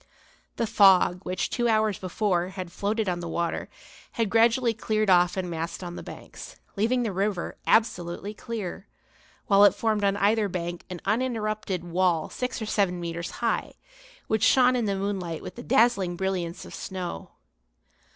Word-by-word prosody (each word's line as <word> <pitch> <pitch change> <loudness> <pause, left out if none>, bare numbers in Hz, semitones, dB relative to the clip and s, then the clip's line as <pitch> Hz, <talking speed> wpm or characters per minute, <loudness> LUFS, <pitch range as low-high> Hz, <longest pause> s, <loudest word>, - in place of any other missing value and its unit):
The 230 - 0
fog 195 -4 +5
which, 185 +1 -2
two 240 -1 0
hours 215 -3 +2
before, 185 -1 0
had 185 -2 -7
floated 210 +3 -1
on 175 -1 -1
the 170 -1 -5
water, 170 0 -2 0.4
had 225 -5 -1
gradually 230 +1 +4
cleared 215 -2 0
off 180 0 +4
and 185 -1 -2
massed 165 +1 -4
on 175 -1 -6
the - - -6
banks, - - -10 0.2
leaving 235 +4 +1
the 215 -4 -2
river 195 -1 -2
absolutely 200 -2 +1
clear; 210 -4 -6 0.6
while 200 0 +5
it 205 - +6
formed 215 -2 0
on 200 0 +2
either 210 +1 +2
bank 175 -1 -4
an 180 -2 -7
uninterrupted 215 -4 -1
wall 175 -2 0
six 255 0 -3
or 220 - -4
seven 195 -4 0
metres 170 0 -4 0.2
high, 230 - -1 0.5
which 220 -1 0
shone 255 +1 +5
in 240 -3 0
the 200 -1 0
moonlight 190 -4 -3
with - - -7
the 240 - -9
dazzling 230 -8 +2
brilliance 185 -1 -3
of - - -11
snow. 180 - -6
195 Hz, 165 wpm, -26 LUFS, 180-220 Hz, 0.6 s, it